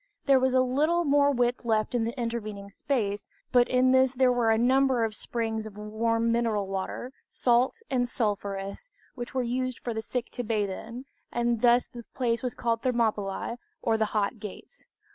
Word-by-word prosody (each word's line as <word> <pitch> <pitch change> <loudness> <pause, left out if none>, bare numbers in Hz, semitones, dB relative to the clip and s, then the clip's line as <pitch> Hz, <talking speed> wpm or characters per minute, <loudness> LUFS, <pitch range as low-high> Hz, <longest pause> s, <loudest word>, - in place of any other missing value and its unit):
There 275 -2 +5
was 260 0 +2
a 255 - +6
little 300 +7 +2
more 285 0 +4
width 245 -2 +1
left 220 -1 0
in 235 -2 +1
the 235 +3 -4
intervening 215 -4 -4
space; 210 -5 -2 0.2
but 245 -1 +4
in 255 0 +4
this 260 0 +4
there 255 0 +4
were 240 -2 +2
a 220 - +4
number 260 +1 +3
of 220 -1 -1
springs 220 -1 -3
of 205 -1 -12
warm 230 +2 0
mineral 230 -3 +1
water, 195 +6 -4 0.2
salt 250 - +1
and 245 -2 0
sulphurous, 200 - -3 0.2
which 245 0 -7
were 255 - +1
used 255 +1 -2
for 240 - -2
the 220 - -3
sick 240 +2 -4
to 245 - -3
bathe 210 -3 0
in, 230 +7 -7 0.3
and 240 -1 0
thus 240 0 +5
the 240 -1 -10
place 235 -3 0
was 250 -2 -3
called 230 -1 -1
Thermopylć, 230 -2 -1 0.2
or 225 - +2
the 220 0 +2
Hot 210 +2 0
Gates. 210 - -10
235 Hz, 185 wpm, -27 LUFS, 220-255 Hz, 0.3 s, a